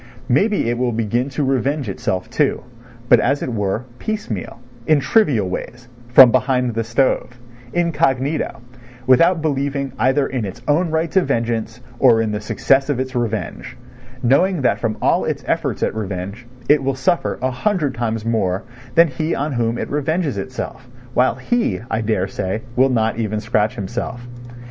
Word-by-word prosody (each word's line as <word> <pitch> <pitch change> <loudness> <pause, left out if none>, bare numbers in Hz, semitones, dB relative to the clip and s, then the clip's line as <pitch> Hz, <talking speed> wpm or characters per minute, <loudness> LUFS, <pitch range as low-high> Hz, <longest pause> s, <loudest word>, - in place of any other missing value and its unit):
Maybe 200 - +2
it 120 0 -1
will 125 -2 0
begin 115 +4 -1
to 140 +2 -2
revenge 135 +1 0
itself, 95 0 -2
too, 135 +4 0 0.4
but, - - +6
as 140 +3 +1
it 125 - -3
were, 105 +2 -1
piecemeal, 165 - -4 0.3
in 155 -2 +5
trivial 135 - +2
ways, 120 +6 -6 0.2
from 120 0 +8
behind 125 -1 +1
the 115 +1 -1
stove, 125 +1 0 0.3
incognito, 145 -6 0 0.4
without 165 +6 +4
believing 140 -2 -1
either 135 +2 +3
in 130 -4 -3
its 105 +4 -7
own 165 +4 +2
right 160 +1 -1
to 190 - +4
vengeance, 115 -3 -2 0.2
or 120 -4 +5
in 110 -1 0
the 105 0 -3
success 135 +6 +1
of 140 -3 0
its 130 0 -3
revenge, 115 -4 -3 0.5
knowing 145 +6 +3
that - - +2
from 110 -2 -2
all - - +3
its - - -3
efforts - - -1
at - - 0
revenge 100 +2 -5 0.2
it 150 -1 +5
will 135 0 0
suffer 175 +6 0
a 130 0 -1
hundred 150 - 0
times 115 -2 -2
more 105 -4 0 0.3
than 170 0 +7
he 155 +4 -2
on 145 +2 -2
whom 115 -1 0
it - - -4
revenges 150 - 0
itself, 125 +4 -6 0.3
while 125 -1 +3
he, 240 - 0
I 110 - 0
daresay, 100 -1 -2
will 130 +2 +4
not 115 -2 0
even 110 -1 -1
scratch 105 -1 0
himself. 120 +4 -5
125 Hz, 165 wpm, -20 LUFS, 115-145 Hz, 0.5 s, from